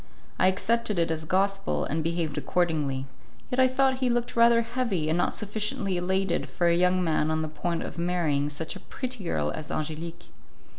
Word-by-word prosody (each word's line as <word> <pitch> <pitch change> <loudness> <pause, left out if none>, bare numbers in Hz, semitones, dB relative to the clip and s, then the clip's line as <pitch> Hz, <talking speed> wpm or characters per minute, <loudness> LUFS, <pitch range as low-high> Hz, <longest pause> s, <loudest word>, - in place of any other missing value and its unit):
I - - +5
accepted 215 +2 +1
it 165 -1 +2
as 160 -1 -3
gospel, 195 +3 +1
and 155 +2 -1
behaved 165 -2 -1
accordingly; 150 -7 0 0.5
yet 250 - 0
I 260 - +7
thought 260 0 +2
he 255 -1 +1
looked 240 0 -1
rather 235 0 +5
heavy 230 -10 -1
and 160 - +2
not - - +2
sufficiently 210 -2 -2
elated 185 0 0
for 175 - -1
a 170 0 +5
young 180 +1 +3
man 155 -2 +1
on 160 0 0
the - - -2
point 165 +2 -2
of - - -6
marrying 165 -5 +1
such 155 +2 -5
a - - -7
pretty 255 -5 -5
girl 75 - -1
as 155 - -6
Angelique. 165 +3 -4
175 Hz, 190 wpm, -27 LUFS, 160-210 Hz, 0.5 s, I